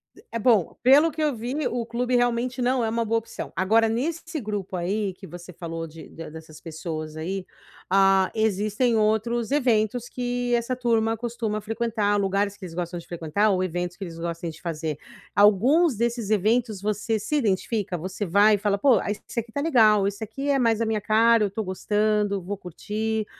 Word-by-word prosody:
E - - -18
é 230 - -3
bom. 220 -6 +3
Pelo 285 +6 +6
que 310 +1 -5
eu 295 -4 +1
vi, 250 +5 -2
o 235 -1 -2
clube 245 +2 -1
realmente 245 +1 +1
não 250 0 +1
é 220 - 0
uma 230 0 -1
boa 225 +1 +1
opção. 225 - -8
Agora, 220 +5 +3
nesse 320 +7 -2
grupo 205 -4 -4
aí 195 +2 -1
que 190 +1 -12
você 175 +1 -10
falou 165 -1 -6
de 160 +1 -12
da 165 - -9
dessas 160 -1 -11
pessoas 155 -1 -6
aí, 185 +4 -4 0.4
ah, 195 0 +4
existem 220 +3 +1
outros 220 +2 +1
eventos 240 -3 +1
que 245 0 -2
essa 235 +2 -1
turma 225 -2 +1
costuma 225 -2 -3
frequentar. 220 -2 0
Lugares 200 +1 0
que 190 - -9
eles 165 - -9
gostam 175 0 -4
de - - -14
frequentar, 170 +5 0
ou 185 -1 +1
eventos 175 0 -3
que 200 - -6
eles 165 -3 -7
gostem 170 0 -4
de 160 - -11
fazer. 160 -3 -3 0.4
Alguns 240 - +4
desses 235 -1 -1
eventos 215 0 +1
você 215 +2 -1
se 300 +9 -2
identifica? 205 -4 -1
Você 185 +5 -4
vai 205 +4 +5
e - - -2
fala: 200 0 0
“Pô, 245 -4 +4
ah, - - -4
esse 225 +3 -5
aqui 230 0 -6
está 285 - -2
legal. 215 -10 +4
Esse 200 +2 -4
aqui 270 +7 -4
é 275 -1 +3
mais 230 -2 +2
a - - +2
minha 220 -2 -1
cara. 225 +1 +4
Eu - - +2
estou 215 +3 -4
gostando, 205 +1 0
vou 200 +3 -5
curtir”, 215 +5 -3
215 Hz, 195 wpm, -25 LUFS, 190-235 Hz, 0.4 s, Pelo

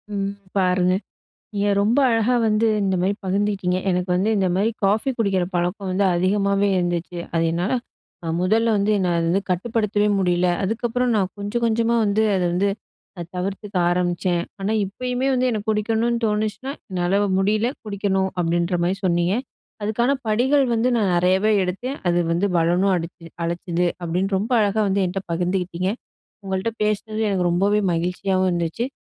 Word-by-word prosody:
ம். 200 0 -2 0.2
பாருங்க, 180 -1 +2 0.6
நீங்க 205 0 0
ரொம்ப 225 +7 +3
அழகா 230 +1 +2
வந்து 215 +1 +2
இந்தமாரி 190 0 +1
பகிந்துகிட்டீங்க. 195 -1 0
எனக்கு 180 0 -1
வந்து 190 +4 +1
இந்தமாரி 190 +2 +1 0.2
காஃபி 210 +6 +2
குடிக்கிற 195 -5 +1
பழக்கம் 180 +3 -1
வந்து 195 +2 +1
அதிகமாவே 200 +2 +2
இருந்துச்சு. 175 0 -2
அது 165 -1 +2
என்னால 175 +6 -1 0.5
அ, - - -3
முதல்ல 220 +5 +2
வந்து 205 +1 +1
என்ன 190 -2 0
அது 165 0 +1
வந்து 190 +4 +2
கட்டுப்படுத்தவே 210 +2 0
முடியல, 180 -1 +2 0.2
அதுக்கப்புறம் 240 +4 -1
நான் 190 -3 +1
கொஞ்சம், 205 +4 -3
கொஞ்சமா 230 +1 +1
வந்து 205 +1 +1
அத 185 - 0
வந்து 195 +3 +1 0.5
அ, - - -3
தவிர்த்துக்க 195 +3 -4
ஆரம்பிச்சேன். 175 0 0 0.2
ஆனா 195 +2 -1
இப்பயுமே 250 +6 -2
வந்து 255 0 +2
எனக்கு 215 -1 -3
குடிக்கணுன்னு 225 +2 0
தோணுச்சுனா, 215 +4 -1 0.2
என்னால 180 +2 +1 0.2
முடியல, 215 +4 +1 0.2
குடிக்கணும் 195 -2 0
அப்பிடின்ற 170 +1 +1
மாரி 180 +2 +1
சொன்னீங்க. 175 +1 +2 0.5
"அதுக்கான 220 +5 +1 0.2
படிகள் 260 +6 +3
வந்து 230 +2 +2
நான் 205 -5 +1
நெறையாவே 185 +4 +3
எடுத்தேன், 245 +10 -4
அது 175 0 +2
வந்து 175 +4 +1
பலனும் 175 +4 +2
அடிச்சு 170 0 -6 0.2
அளிச்சது" 175 +1 -1
அப்பிடின்னு 180 +3 -1
ரொம்ப 210 +6 -3
அழகா 210 +1 +1
வந்து 195 0 +1
என்ட்ட 190 +2 -3
பகிர்ந்துக்கிட்டீங்க. 180 +1 -1 0.5
உங்கள்ட்ட 190 +4 -1
பேசுனது 215 +1 -1
எனக்கு 180 -3 +1
ரொம்பவே 200 +4 +2
மகிழ்ச்சியாவும் 185 +2 0
இருந்துச்சு. 170 +7 -1
195 Hz, 150 wpm, -22 LUFS, 180-215 Hz, 0.6 s, ரொம்ப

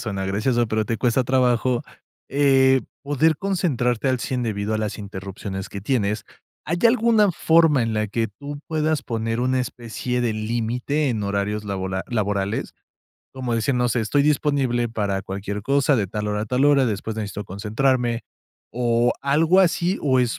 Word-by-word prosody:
suena 100 -4 -3
gracioso, 115 +4 0
pero 110 0 0
te 115 +2 -2
cuesta 125 0 +2
trabajo, 125 -1 +2 0.5
eh, 135 -1 +4 0.2
poder 145 +2 +2
concentrarte 140 - 0
al 130 -2 0
100 125 -2 -2
debido 105 -1 -2
a 110 - 0
las 110 0 -3
interrupciones 95 -1 -6
que 100 - -7
tienes, 105 -2 -1 0.4
¿hay 170 +4 -1
alguna 225 -4 +4
forma 160 -5 +4
en 115 -1 -1
la 110 0 0
que 115 +2 -1
tú 145 +7 -8
puedas 155 -2 0
poner 115 0 -2
una 130 +1 +1
especie 125 0 -3
de 120 -2 0
límite 120 +6 -1
en 110 -4 -1
horarios 100 +1 -2
labola 95 -1 -3
laborales? 105 -3 -1 0.6
Como 125 -3 -2
dicen, 125 +3 0
no 125 -1 +1
sé, 120 - +1
estoy 125 +6 +2
disponible 140 -5 +1
para 100 -4 -1
cualquier 100 +1 -5
cosa, 140 +2 +2
de 105 -6 +1
tal 105 +2 -4
hora 105 0 -1
a - - -5
tal 125 +5 +1
hora, 140 -3 +5
después 110 +1 -3
necesito 105 -1 -4
concentrarme, 115 +4 0 0.5
o 120 0 +2
algo 155 +7 +3
así, 175 +1 +2
o 130 -3 +3
es 120 -2 -1
120 Hz, 170 wpm, -23 LUFS, 105-140 Hz, 0.6 s, hora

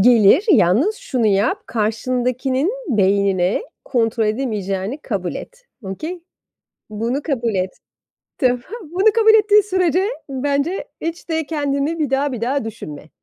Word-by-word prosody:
Gelir, 235 - +6
yalnız 255 - +4
şunu 240 -4 -1
yap 215 - +1
karşındakinin 255 - 0 0.2
beynine 195 - +2 0.2
kontrol 225 -2 +1
edemeyeceğini 215 -1 -2
kabul 190 -6 -3
et, - - -9 0.2
okay? 310 - -5 0.7
Bunu 235 +7 -2
kabul 240 -8 -1
et. 185 0 0 0.7
Tamam? 250 -2 +2 0.2
Bunu 375 +7 +2
kabul 445 -1 +5
ettiğin 420 -1 +6
sürece 375 -1 +1 0.2
bence 280 +6 -1 0.2
hiç 335 +2 -5
de 320 -2 -1
kendini 290 +1 -1
bir 295 -4 0
daha 275 +1 +1
bir 240 - -5
daha 255 +1 0
düşünme 150 -8 -8
255 Hz, 125 wpm, -20 LUFS, 215-320 Hz, 0.7 s, Gelir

